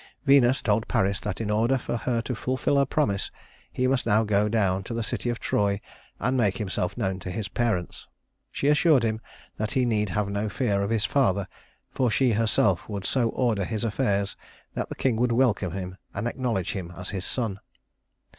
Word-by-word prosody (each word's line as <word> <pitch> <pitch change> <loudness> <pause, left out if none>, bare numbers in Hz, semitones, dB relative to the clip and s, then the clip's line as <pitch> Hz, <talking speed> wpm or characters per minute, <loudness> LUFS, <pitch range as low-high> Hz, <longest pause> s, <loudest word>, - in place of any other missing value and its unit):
Venus 135 -2 +5
told 110 0 +1
Paris 95 0 +1
that 105 -3 -4
in 110 -2 -2
order 115 +5 +2
for 120 - -3
her 115 0 -1
to 125 - -3
fulfill 130 +4 0
her 140 -1 +3
promise, 105 -10 0 0.4
he 130 - -1
must 130 -2 +1
now 110 0 +4
go 105 0 +2
down 100 -4 +1
to 115 - -5
the 115 - -1
city 120 - -2
of 120 - -1
Troy 100 -1 +1 0.4
and 125 +1 0
make 105 -6 +2
himself 100 -5 -2
known 95 0 -1
to 90 - -6
his 95 +2 -3
parents. 110 -8 -2 0.4
She 140 - -1
assured 150 -3 +5
him 110 -1 -1 0.4
that 110 0 -2
he 130 -1 +2
need 105 -3 +1
have 105 +3 0
no 100 +1 -2
fear 100 -2 0
of 100 - -1
his 110 -2 +1
father, 100 -5 +1 0.4
for 125 -2 +1
she 125 +2 +3
herself 105 -4 +2
would 100 -2 -4
so 120 -4 +2
order 115 -6 0
his 110 +3 -3
affairs 100 -3 0 0.4
that - - -3
the - - -5
king 125 -4 +1
would 125 +1 +2
welcome 115 -7 +2
him 95 -1 -5 0.2
and 100 +4 -2
acknowledge 120 -7 -1
him 90 -3 -5
as 90 +1 -5
his 95 -3 -3
son. 110 -5 -2
110 Hz, 200 wpm, -26 LUFS, 100-125 Hz, 0.4 s, Venus